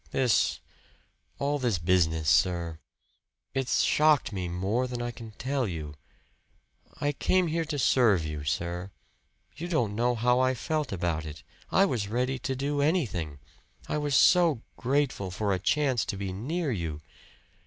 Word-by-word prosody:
"This 125 -4 +2 0.8
all 145 +1 0
this 120 -7 +1
business, 80 -2 +1
sir 85 -1 +2 0.7
it's 135 -2 +1
shocked 150 -6 +3
me 90 -2 -3
more 100 +8 -1
than 125 -1 -5
I 120 0 -3
can 115 -1 -10
tell 130 +1 -1
you. 80 -5 -5 1.1
I 145 - +1
came 185 +5 +1
here 165 0 -1
to 150 -2 -3
serve 115 - +3
you, 75 -1 -5
sir. 85 +4 -2 0.7
You 170 - -5
don't 120 - 0
know 120 +3 +1
how 125 +2 +2
I 130 0 +2
felt 150 +3 -2
about 85 -4 -1
it. 75 -4 -9 0.3
I 195 - +5
was 120 - -1
ready 125 +4 -1
to 135 0 -3
do 140 +2 -1
anything 105 - 0 0.5
I 150 - -1
was 145 -2 0
so 170 -9 +5
grateful 130 -6 0
for 100 +2 -1
a 95 - -1
chance 130 0 +1
to 100 - -4
be 95 -1 -4
near 145 - -2
you! 80 -8 -3
120 Hz, 155 wpm, -28 LUFS, 90-140 Hz, 1.1 s, I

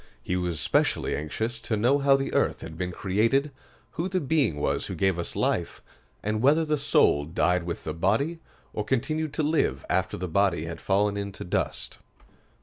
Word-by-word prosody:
He 90 - -1
was 90 -3 -1
specially - - +1
anxious 110 +10 -3
to 110 -1 -1
know 125 +7 +3
how 140 -1 +5
the 135 0 -2
earth - - +1
had 80 0 -8
been 90 +2 -3
created, 115 +11 +1 0.4
who 175 +3 -3
the 185 0 0
Being 145 - +1
was - - -1
who - - -5
gave 95 -3 +1
us 85 - -4
life, - - 0 0.4
and 110 +1 -1
whether 150 +5 +4
the 150 -1 0
soul 75 - +3
died 85 +3 +1
with 85 - -4
the 80 - -3
body, 115 - 0 0.3
or 105 - -2
continued 140 +7 -1
to 155 - 0
live 155 +2 +1
after - - 0
the 90 - -3
body 90 -2 +1
had 85 0 -6
fallen 100 +1 +1
into 100 -1 -5
dust. 90 - -3
105 Hz, 185 wpm, -27 LUFS, 90-140 Hz, 0.4 s, how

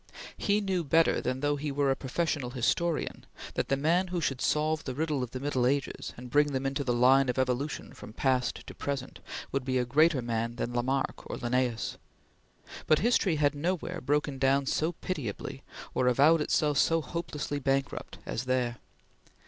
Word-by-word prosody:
He 205 +1 +1
knew 190 -3 0
better 165 +3 +3
than 130 +1 -2
though 145 0 +1
he 145 +1 -3
were 140 0 +2
a - - +2
professional 140 -1 -2
historian 150 +7 0 0.3
that - - -1
the 135 - +2
man 170 +6 +2
who 180 -1 -2
should 135 -4 -1
solve 155 +1 +1
the 130 - -4
riddle 150 -2 0
of 125 - -3
the 130 - -6
Middle 130 -3 +1
Ages 140 0 -1
and 125 0 -9
bring 145 +1 +3
them 135 0 -1
into 135 +1 -1
the 125 - 0
line 130 +2 +5
of 125 - -1
evolution 130 +3 -1
from - - -10
past 125 +1 0
to - - -9
present, 140 -2 -4 0.3
would 135 -1 -1
be 130 0 0
a 125 - +1
greater 145 +1 +3
man 115 0 -2
than 120 0 -3
Lamarck 130 +3 -1
or - - -4
Linnaeus; 120 -1 -1 0.9
but 155 - +5
history 205 -5 +2
had 145 -1 +2
nowhere 175 +3 -2
broken 145 0 0
down 135 +1 +3
so 160 +5 0
pitiably, 145 - -5 0.3
or 125 - +1
avowed 145 +6 +5
itself 150 -1 +2
so 165 -1 +3
hopelessly 150 -2 -4
bankrupt, 135 0 -1
as 120 - -3
there. 125 -2 0
140 Hz, 180 wpm, -29 LUFS, 125-155 Hz, 0.9 s, line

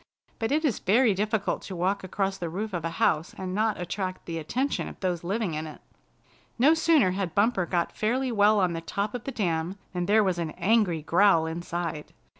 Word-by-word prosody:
But 225 +1 -1
it 310 +2 +2
is 255 -9 +1
very 220 +3 +3
difficult 210 +1 -1
to 190 - -7
walk 190 +3 0
across 195 +1 -2
the 170 -2 -3
roof 205 +5 -4
of 175 -3 -3
a 165 - -1
house 160 +2 +1
and 185 -1 -4
not 215 0 0
attract 185 +1 -4
the 165 -1 -4
attention 255 - -2
of - - -10
those 180 -3 -2
living 195 0 -1
in 155 +1 -3
it. 155 - -10 0.8
No 275 +7 +5
sooner 320 - +3
had 185 -3 -3
Bumper 200 -3 +2
got 170 -1 -1
fairly 250 +4 0
well 210 -1 +4
on 180 -3 +2
the 165 - -4
top 200 +5 -3
of 245 -2 -6
the 275 - -3
dam, 175 -4 -1 0.2
than 180 -1 -2
there 215 +1 +5
was 185 -3 0
an 160 -2 -3
angry 185 -4 +2
growl 170 0 +4
inside. 165 -1 -4
190 Hz, 210 wpm, -27 LUFS, 170-215 Hz, 0.8 s, No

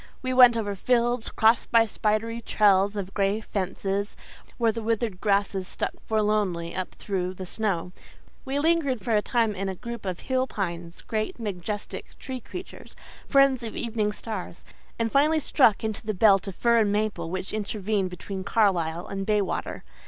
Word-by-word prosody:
We 255 0 -1
went 250 -2 +8
over 205 -3 -2
fields, 240 +3 +1
crossed 225 +2 +3
by 230 -1 +5
spidery 220 +2 -1
trails 205 -2 +3
of 195 -2 -4
gray 200 +1 +1
fences, 200 0 -3 0.4
where 230 -2 +3
the 230 +1 -5
withered 220 -3 -1
grasses 200 -2 +1
stuck - - -2 0.2
forlornly 210 -6 0
up 185 -1 -4
through 185 -2 -3
the 185 - -6
snow; 180 -3 -2 0.5
we 270 +1 -2
lingered 290 -6 +2
for 225 +3 0
a 210 - +4
time 230 -2 +1
in 195 0 -3
a 190 - -4
group 235 +1 -7
of 180 -2 -3
hill 260 0 0
pines, 170 -5 -5
great, 215 +1 -3
majestic 205 -1 -5
tree 260 -1 -6
creatures, 360 - -10 0.3
friends 275 -3 +4
of 230 -2 -6
evening 220 -3 -1
stars; 210 -5 -7 0.3
and 230 -1 -1
finally 305 +3 +4
struck 245 -8 +3
into 220 0 -3
the 215 -1 -2
belt 195 0 +5
of 195 - -5
fir 235 +2 +3
and 210 -2 +2
maple 205 -5 -1
which 185 +2 -4
intervened 210 -2 -1
between 190 +2 -6
Carlisle 180 -6 +1
and 195 0 -5
Baywater. 210 -3 -1
210 Hz, 165 wpm, -26 LUFS, 195-230 Hz, 0.5 s, went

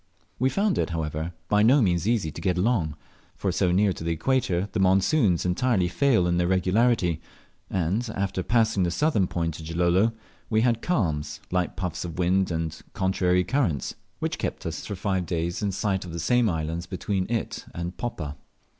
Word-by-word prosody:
We 130 +2 +3
found 200 +5 +1
it, - - 0
however, 80 0 -3 0.2
by 105 0 +3
no 125 +7 +6
means 90 -5 +2
easy 110 -9 +1
to 80 - -8
get 90 0 +1
along; 90 - +1 0.4
for - - -1
so 90 - +1
near 100 +2 +3
to 80 - -8
the 85 0 0
equator 95 -2 0
the 110 - -2
monsoons 95 - +3
entirely 95 +1 +2
fail 115 0 +2
of 85 0 +1
their 90 - +2
regularity, 95 -2 +2 0.5
and 95 +7 -1
after 95 -1 -1
passing 110 -1 +2
the 90 - +2
southern 105 - +2
point 85 -2 -2
of 80 - -8
Gilolo 90 +6 +2 0.4
we 110 -1 +3
had 120 -1 +2
calms, 80 - -1
light 90 -1 0
puffs 90 -4 -3
of 85 -1 -6
wind, 95 +2 +2
and 80 -2 -3
contrary 90 -1 +2
currents, 105 - 0 0.2
which - - -3
kept - - -3
us - - -4
for 100 - -4
five 95 -2 -1
days 85 0 -2
in 100 -2 0
sight 95 0 -1
of 90 -2 -8
the 85 - -4
same 120 +5 +3
islands 80 0 -3
between 95 +2 -2
it 115 -2 -2
and 85 +1 -5
Poppa. 80 -12 -4
90 Hz, 185 wpm, -26 LUFS, 85-110 Hz, 0.5 s, no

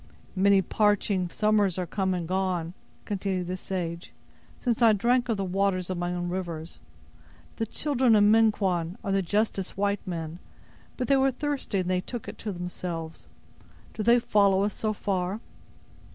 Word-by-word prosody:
"Many 195 0 +4
parching 205 -2 +1
summers 210 -2 +2
are 180 - -1
come 190 0 -1
and 170 -2 -3
gone," 180 -2 -1 0.3
continued 190 -2 -2
the 180 +1 -3
sage, 175 -2 -5 0.5
"since 240 -2 -1
I 225 -2 +7
drank 240 +4 +2
of 225 - +1
the 195 - -1
water 195 +1 +1
of 185 0 -3
my 175 0 -2
own 175 0 -2
rivers. 175 -3 -5 0.8
The 225 - -1
children 260 -3 +2
of 205 - +5
Minquon 205 -5 +3
are 195 - -2
the 195 0 +2
justest 200 0 -1
white 200 0 0
men, 165 -1 -4 0.6
but 250 - -2
they 275 - +4
were 270 0 +4
thirsty 275 -5 -2
and 185 -2 -1
they 180 0 +1
took 240 +5 -7
it - - -8
to 215 - -3
themselves. 175 -2 -6 0.6
Do - - -4
they 235 +3 +5
follow 200 -4 +3
us 205 - 0
so 215 - -1
far?" 195 -1 -2
195 Hz, 165 wpm, -27 LUFS, 180-215 Hz, 0.8 s, I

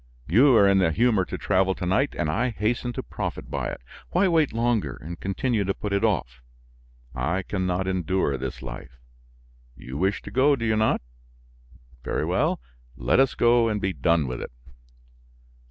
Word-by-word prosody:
You 125 +8 +5
are 100 -3 +6
in 100 0 +4
the 90 -4 +3
humor 110 0 +2
to - - -5
travel 95 -1 +1
to 90 - -5
night 110 +11 +1
and 85 - 0
I 110 +12 0
hasten 120 +2 -1
to - - -4
profit - - -5
by - - -2
it. - - -7 0.3
Why 185 +3 +2
wait 160 -5 +2
longer 115 -1 0
and 85 +2 -9
continue 105 +3 -1
to 95 0 -1
put 105 -1 -4
it 100 +2 +1
off? 70 - -1 0.7
I 80 +10 -1
can 95 -2 -2
not 90 +1 -1
endure 95 -5 0
this 65 0 -6
life. 65 0 -9 0.8
You 65 +2 -8
wish 95 +1 0
to - - -9
go, 140 +3 +4
do 115 -4 -4
you 110 -1 +2
not? 110 0 +2 1.0
Very - - -1
well, - - +1 0.4
let 60 - +2
us 135 -1 +3
go 120 0 +4
and 105 -1 -1
be 95 -1 -1
done 85 -4 +2
with 65 -1 -5
it." - - -6
100 Hz, 185 wpm, -25 LUFS, 85-115 Hz, 1.0 s, are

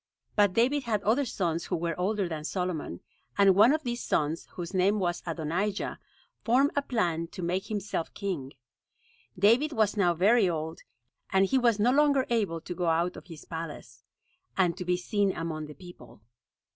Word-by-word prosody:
But 205 -3 +4
David 260 +6 +2
had 215 -4 -1
other 245 +7 +2
sons 170 -7 -2
who - - -2
were 170 0 -1
older 195 +1 0
than 160 -3 -5
Solomon; 170 - -3 0.4
and 200 -1 +6
one 215 +7 +6
of 310 +1 0
these 240 -1 -3
sons, 155 +1 -1
whose 175 +1 -6
name 190 +3 +3
was 175 -3 -1
Adonijah, 170 +5 -2 0.4
formed 260 +5 +3
a 285 - +2
plan 175 -11 -1
to 180 - -8
make 180 +3 -1
himself 205 -5 -3
king. 170 -10 -4 0.8
David 235 +11 +4
was 215 -3 +2
now 180 -4 +2
very 200 +3 +4
old; 160 +1 -4 0.5
and 190 0 +4
he 265 +7 +2
was 235 -4 +3
no 225 +4 +3
longer 280 -1 +3
able 200 -8 0
to 175 - -6
go 175 -1 -2
out 170 +2 +1
of - - -11
his 165 -4 -11
palace, 150 -8 -8 0.5
and 175 -3 +2
to 180 - -6
be 180 0 +1
seen 200 +1 0
among 155 -2 -4
the 150 - -11
people. 175 - -14
185 Hz, 180 wpm, -28 LUFS, 165-215 Hz, 0.8 s, and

